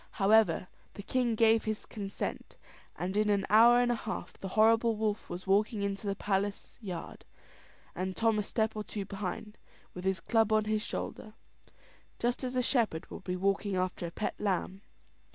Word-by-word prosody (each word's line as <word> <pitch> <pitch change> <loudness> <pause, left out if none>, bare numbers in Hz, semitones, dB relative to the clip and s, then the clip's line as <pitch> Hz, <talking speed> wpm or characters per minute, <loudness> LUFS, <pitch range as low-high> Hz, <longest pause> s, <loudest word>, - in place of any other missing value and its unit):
However, 210 -2 +3 0.3
the 200 - -7
king 245 0 0
gave 225 0 +4
his 215 -1 -3
consent; 200 -3 -5 0.4
and 185 +2 -3
in 210 0 +2
an 200 -1 +2
hour 235 +3 +7
and 245 0 +3
a - - +1
half 220 -5 -5
the 195 - -7
horrible 225 +3 +4
wolf 215 -1 -2
was 175 +2 -6
walking 205 +2 +2
into 200 +1 -3
the 200 - 0
palace 200 0 -2
yard, 180 -6 -7 0.7
and 185 +1 -3
Tom 225 -1 +2
a - - +2
step 220 +1 -1
or 215 - -3
two 205 -1 -5
behind, 195 +2 -5 0.3
with 180 - -7
his 190 -1 0
club 225 +4 +2
on 215 0 +3
his 215 0 0
shoulder, 215 -1 -5 0.8
just 240 +2 -1
as 255 0 -3
a 250 - +2
shepherd 230 - 0
would - - -8
be 180 - -2
walking 195 +1 0
after 185 -1 -1
a - - -7
pet 210 - -2
lamb. 195 -1 -1
210 Hz, 180 wpm, -31 LUFS, 195-220 Hz, 0.8 s, hour